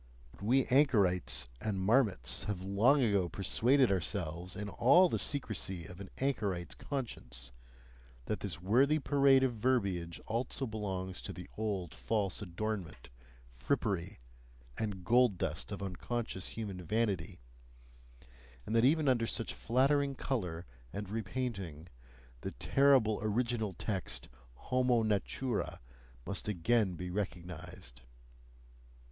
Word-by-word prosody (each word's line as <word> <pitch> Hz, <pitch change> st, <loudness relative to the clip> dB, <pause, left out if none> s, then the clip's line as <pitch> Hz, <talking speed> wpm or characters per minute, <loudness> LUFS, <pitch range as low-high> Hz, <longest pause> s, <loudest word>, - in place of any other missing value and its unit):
But -, -, -18 dB
we 125 Hz, +6 st, +3 dB
anchorites 105 Hz, -, +3 dB
and 105 Hz, -3 st, -1 dB
marmots 95 Hz, -, +2 dB
have 100 Hz, -3 st, -3 dB
long 115 Hz, +9 st, +4 dB
ago 100 Hz, -6 st, +2 dB
persuaded 120 Hz, -, +3 dB
ourselves 90 Hz, -1 st, -2 dB
in 105 Hz, 0 st, -4 dB
all 140 Hz, -, +5 dB
the -, -, 0 dB
secrecy 100 Hz, -, -1 dB
of 90 Hz, +2 st, -10 dB
an 95 Hz, -, -8 dB
anchorite's 105 Hz, -10 st, -1 dB
conscience, 65 Hz, -, -5 dB, 0.7 s
that 105 Hz, -, -2 dB
this 90 Hz, -7 st, -4 dB
worthy 130 Hz, -, +4 dB
parade 140 Hz, -2 st, +4 dB
of 130 Hz, -2 st, +2 dB
verbiage 100 Hz, -8 st, 0 dB
also 120 Hz, +4 st, -2 dB
belongs 95 Hz, -5 st, -4 dB
to -, -, -5 dB
the -, -, -9 dB
old 100 Hz, -6 st, -2 dB
false 105 Hz, -3 st, -1 dB
adornment, 90 Hz, -, -4 dB, 0.4 s
frippery, 90 Hz, -, -2 dB, 0.6 s
and 100 Hz, -5 st, -4 dB
gold 120 Hz, -2 st, +4 dB
dust -, -, -3 dB
of -, -, -4 dB
unconscious 95 Hz, +1 st, -3 dB
human 100 Hz, -5 st, -5 dB
vanity, 100 Hz, -2 st, -1 dB, 1.3 s
and 110 Hz, -, -2 dB
that 115 Hz, -, +5 dB
even 150 Hz, +3 st, +4 dB
under 120 Hz, -3 st, +3 dB
such 115 Hz, -, -2 dB
flattering 140 Hz, +3 st, +2 dB
colour 90 Hz, -12 st, -3 dB, 0.3 s
and 100 Hz, -1 st, -5 dB
repainting, 100 Hz, -, -4 dB, 0.5 s
the -, -, -5 dB
terrible 135 Hz, -6 st, +4 dB
original 110 Hz, -1 st, 0 dB
text 95 Hz, +2 st, -3 dB, 0.3 s
HOMO 125 Hz, -, +2 dB
NATURA 110 Hz, +3 st, -1 dB, 0.5 s
must 100 Hz, -, -2 dB
again 105 Hz, 0 st, +2 dB
be 90 Hz, +1 st, -5 dB
recognized. 90 Hz, -10 st, -6 dB
105 Hz, 120 wpm, -33 LUFS, 90-125 Hz, 1.3 s, all